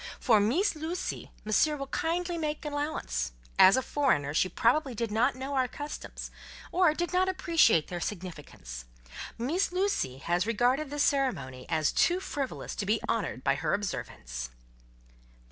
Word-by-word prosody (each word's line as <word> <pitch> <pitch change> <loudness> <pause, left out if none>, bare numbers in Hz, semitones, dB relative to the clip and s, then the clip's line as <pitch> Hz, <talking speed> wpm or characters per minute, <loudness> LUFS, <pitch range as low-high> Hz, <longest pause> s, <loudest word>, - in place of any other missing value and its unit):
For 225 -5 +4
Meess 270 - +2
Lucie, 320 +4 -4 0.2
Monsieur 295 +8 +3
will 275 - -4
kindly 345 +5 -1
make 305 -2 -3
allowance; 290 - -2 0.3
as 190 +6 +8
a 260 - +1
foreigner 145 - +1
she 185 +4 +2
probably 250 - +2
did 230 0 -2
not 240 +5 +2
know 265 +2 -5
our 260 -2 +2
customs, 290 +3 -7 0.4
or 345 -4 +4
did 345 +2 -2
not 370 +1 +3
appreciate 330 - +3
their 175 - -4
significance. 150 - -6 0.5
Meess 310 +13 0
Lucie 360 - 0
has 175 +7 0
regarded 250 +6 +2
this 290 0 0
ceremony 235 - 0
as 155 -2 +2
too 355 +1 +3
frivolous 280 -7 -4
to 205 - -2
be 215 +2 +2
honoured 205 - -1
by - - +3
her 155 +5 0
observance." 60 - -5
250 Hz, 150 wpm, -29 LUFS, -, 0.5 s, as